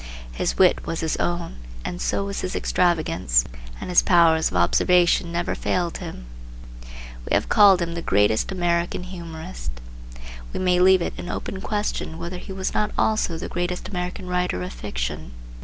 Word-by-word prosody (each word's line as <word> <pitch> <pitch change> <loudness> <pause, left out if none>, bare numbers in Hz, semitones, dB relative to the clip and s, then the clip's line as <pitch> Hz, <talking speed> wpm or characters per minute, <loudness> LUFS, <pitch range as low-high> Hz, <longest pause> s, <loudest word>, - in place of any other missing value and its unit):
His - - -2
wit 185 -2 +4
was 165 -1 -2
his 160 -1 0
own, 175 - -2 0.3
and 175 - -4
so 200 - 0
was 200 0 -4
his 185 - -3
extravagance, 155 - +2 0.3
and - - -5
his 175 - +6
powers 165 -3 +4
of 90 - -2
observation 175 - +3
never 170 0 -1
failed 175 -2 -1
him. 60 - -8 1.0
We - - -1
have - - 0
called 195 -4 +6
him 170 0 -4
the 170 - -4
greatest 105 - +2
American 175 -1 0
humorist. 170 - -7 0.8
We - - -3
may 180 -1 +2
leave 185 -1 +5
it - - -3
an 175 - -6
open 190 - -5
question 205 -6 -2
whether 170 +2 -5
he - - -9
was 190 0 -3
not 210 - +1
also 215 -6 +1
the 160 - -5
greatest 175 +1 -3
American 180 0 -4
writer 180 - -1
of 90 - -6
fiction. - - -5
175 Hz, 170 wpm, -23 LUFS, 160-185 Hz, 1.0 s, his